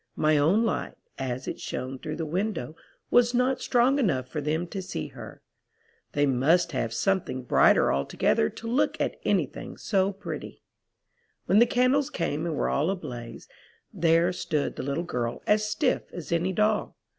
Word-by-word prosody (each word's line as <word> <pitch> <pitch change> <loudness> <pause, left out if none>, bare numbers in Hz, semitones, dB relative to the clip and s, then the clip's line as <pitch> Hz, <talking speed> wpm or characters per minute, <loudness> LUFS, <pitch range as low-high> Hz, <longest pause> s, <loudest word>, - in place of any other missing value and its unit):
My 155 0 +3
own 165 +10 +3
light, 225 - -2 0.2
as 130 -1 -3
it - - -4
shown 130 +1 -5
through 155 +2 -5
the 165 0 -3
window, 165 - -2 0.4
was 245 0 +4
not 255 +1 +1
strong 255 +3 +3
enough 135 - +1
for 150 +3 -4
them 155 +4 -1
to 195 - -4
see 185 - -5
her. - - -11 0.7
They 145 0 +3
must 155 +7 +3
have 120 -5 -2
some 195 +9 +1
thing 130 -4 -6
brighter 120 - +4
altogether 70 +2 +1
to 230 - -9
look 250 +5 +1
at - - -1
anything - - -1
so 195 -2 +1
pretty. 200 +1 -8 0.8
"When 200 - +4
the 240 - +6
candles 255 +3 +2
came 160 -1 -2
and 160 - -2
were - - 0
all 150 +5 +1
ablaze, 125 -11 -6 0.5
there 170 +2 +3
stood 155 -4 -2
the - - -4
little 140 +5 -2
girl 120 -8 -3
as 210 0 +2
stiff 255 +4 0
as 170 -2 -8
any 170 +3 +1
doll. 210 +2 0
170 Hz, 170 wpm, -27 LUFS, 140-210 Hz, 0.8 s, the